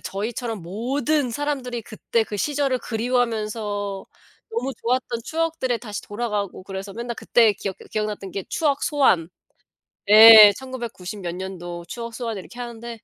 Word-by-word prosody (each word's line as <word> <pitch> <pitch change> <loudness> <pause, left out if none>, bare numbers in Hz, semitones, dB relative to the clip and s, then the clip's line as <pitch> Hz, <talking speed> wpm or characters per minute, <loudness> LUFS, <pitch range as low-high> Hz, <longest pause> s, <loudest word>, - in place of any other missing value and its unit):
저희처럼 225 +1 -4
모든 250 - -1
사람들이 260 -2 -3
그때 225 +1 -2
그 215 -1 -6
시절을 275 +1 0
그리워하면서 220 -4 -2 0.4
너무 445 -12 -2
좋았던 245 -1 -1
추억들에 320 -7 -1
다시 210 -3 -7
돌아가고 205 -4 -4
그래서 195 +1 -7
맨날 235 +2 -5
그때 225 -4 +3
기억해 195 -1 -5
기억났던 210 -2 -3
게 190 +1 -5
추억 290 -4 0
소환. 195 - +2 0.8
예 215 -1 +11
1990 235 -7 -7
몇 175 -1 -4
년도 175 -2 -7
추억 230 +5 -7
소환 230 -3 -4
이렇게 240 +6 -10
하는데 235 -1 -7
230 Hz, 320 characters per minute, -23 LUFS, 205-250 Hz, 0.8 s, 예